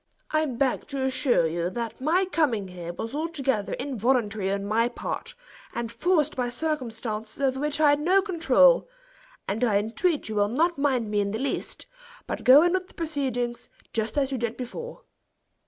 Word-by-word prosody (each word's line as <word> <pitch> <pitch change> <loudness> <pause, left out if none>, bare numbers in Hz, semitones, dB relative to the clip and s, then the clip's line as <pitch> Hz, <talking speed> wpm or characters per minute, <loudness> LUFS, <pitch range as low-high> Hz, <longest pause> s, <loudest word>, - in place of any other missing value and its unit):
I 310 0 +2
beg 260 0 -1
to 275 -2 -3
assure 260 - +2
you 170 +2 -1
that 230 +4 -5
my 340 +7 +2
coming 265 - 0
here 175 -1 -6
was 225 +7 -6
altogether 280 -9 -1
involuntary 235 -6 0
on 200 0 -2
my 225 +3 +2
part, 470 - -5 0.4
and 230 -1 -3
forced 310 0 +1
by 250 -1 -1
circumstances 235 -6 -3
over 265 -1 +1
which 295 +1 -1
I 300 -2 +6
had 290 - +2
no 370 +5 +3
control; 410 +8 +4 0.6
and 215 +5 -1
I 215 -5 +3
entreat 260 - 0
you 220 - -4
will 205 -1 +2
not 320 +6 +1
mind 255 -7 +1
me 210 - +1
in 200 0 0
the 215 - -2
least, 270 +3 -3 0.4
but - - -5
go 270 +5 +8
on 350 0 +2
with 370 -1 -1
the - - -19
proceeding, 265 -7 -2 0.4
just 220 +3 -2
as 275 -1 +1
you 265 - -2
did 235 0 -2
before. 470 - -7
260 Hz, 180 wpm, -26 LUFS, 220-305 Hz, 0.6 s, go